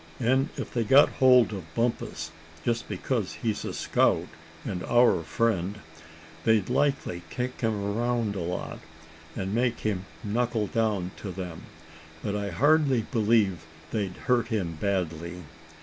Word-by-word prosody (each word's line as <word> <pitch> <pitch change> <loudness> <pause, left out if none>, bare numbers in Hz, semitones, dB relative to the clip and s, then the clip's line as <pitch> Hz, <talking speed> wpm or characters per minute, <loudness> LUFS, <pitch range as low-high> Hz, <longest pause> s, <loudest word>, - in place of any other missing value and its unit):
And 130 +3 +2
if - - -5
they've 115 -3 0
got 140 +4 +7
hold 125 -3 +6
of 85 -5 -8
Bumpus, 115 0 -1 0.3
just 115 -1 -1
because 105 +1 -2
he's 110 -3 -2
a - - -3
scout, - - +2 0.4
and 90 - -3
our 120 -7 +4
friend, 95 +2 0 0.7
they'd 110 -3 +3
likely 140 -11 +1
kick 125 +4 -4
him 110 -2 +1
around 115 0 0
a - - -3
lot, 90 +2 -4 0.6
and 95 +1 -3
make 120 0 +1
him 100 -3 -1 0.2
knuckle 115 +1 0
down 105 -5 0
to 100 - -6
them; 90 -2 -7 0.6
but 105 -1 -1
I 100 -1 -2
hardly 140 - +3
believe 105 - +2 0.3
they'd 100 -4 -2
hurt 125 -2 +2
him 100 -8 -1
badly. 85 -1 -2
110 Hz, 140 wpm, -27 LUFS, 95-120 Hz, 0.7 s, got